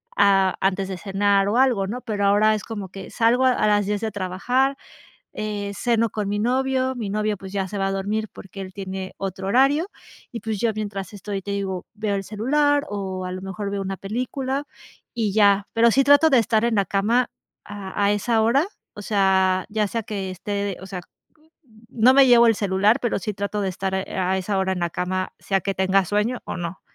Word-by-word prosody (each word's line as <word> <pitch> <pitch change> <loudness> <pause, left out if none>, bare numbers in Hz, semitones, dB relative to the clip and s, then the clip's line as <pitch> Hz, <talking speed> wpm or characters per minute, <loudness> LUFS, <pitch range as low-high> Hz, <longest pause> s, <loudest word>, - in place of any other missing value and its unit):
a 195 -2 +4
antes 195 0 +1
de 190 -1 -5
cenar 200 +1 +1
o 220 - +1
algo, 245 -7 +3
¿no? 235 +5 -4
Pero 210 -5 -2
ahora 210 +2 +4
es 210 - -5
como 205 -4 -6
que 190 +1 -9
salgo 240 +3 +3
a 260 - +5
a 215 - +1
las 205 -1 +3
10 205 +1 -1
de 220 -1 -2
trabajar, 225 +8 0 0.6
eh, 205 -1 -3
ceno 230 +1 +1
con 210 -2 -3
mi 205 +1 -1
novio, 260 +3 0
mi 225 -5 -4
novio, 210 +1 -1
pues 190 0 -10
ya 195 -1 -1
se 205 - -7
va 195 -1 0
a - - -2
dormir 210 +3 -2
porque 195 +1 -11
él 190 -1 -7
tiene 190 -1 -6
otro 190 0 -4
horario, 275 - +3 0.4
y 235 - -4
pues 220 -3 -3
yo 230 - +2
mientras 200 -3 -5
estoy 200 -1 -5
te 200 - -6
digo, 195 -2 -3
veo 210 -1 -2
el 195 - -1
celular 285 +8 +1
o 190 -2 -4
a 180 - -5
lo 185 0 -6
mejor 195 +1 -5
veo 200 0 -2
una 195 0 -4
película 260 +6 -3 0.5
y 220 -4 -1
ya. 200 -1 +4
Pero 230 +1 +5
sí 270 +4 +3
trato 285 +3 +6
de 265 - +5
estar 225 0 +2
en 235 -1 +1
la 200 - +3
cama 230 +5 +1 0.4
a 200 0 -4
a 200 - +4
esa 220 +2 +1
hora, 265 +8 +3 0.3
o - - -9
sea, 190 -2 +2
ya 210 0 +1
sea 230 +3 -2
que 200 -4 -4
esté, 200 +1 -3
o - - -8
sea, 190 -2 -6 0.9
no 240 +3 +4
me 275 0 +7
llevo 240 -1 +7
el 225 - +5
celular, 200 +2 +2
pero 240 - 0
sí 205 +3 -3
trato 200 +1 -3
de 195 - 0
estar 190 +1 -3
a 190 -1 -1
esa 195 +1 -1
hora 190 0 +1
en 185 - -3
la 170 -1 -1
cama, 185 +2 -2
sea 195 -1 0
que 195 +1 -2
tenga 190 +1 +2
sueño 210 +6 0
o - - -5
no. 170 +1 -5
205 Hz, 220 wpm, -23 LUFS, 195-230 Hz, 0.9 s, me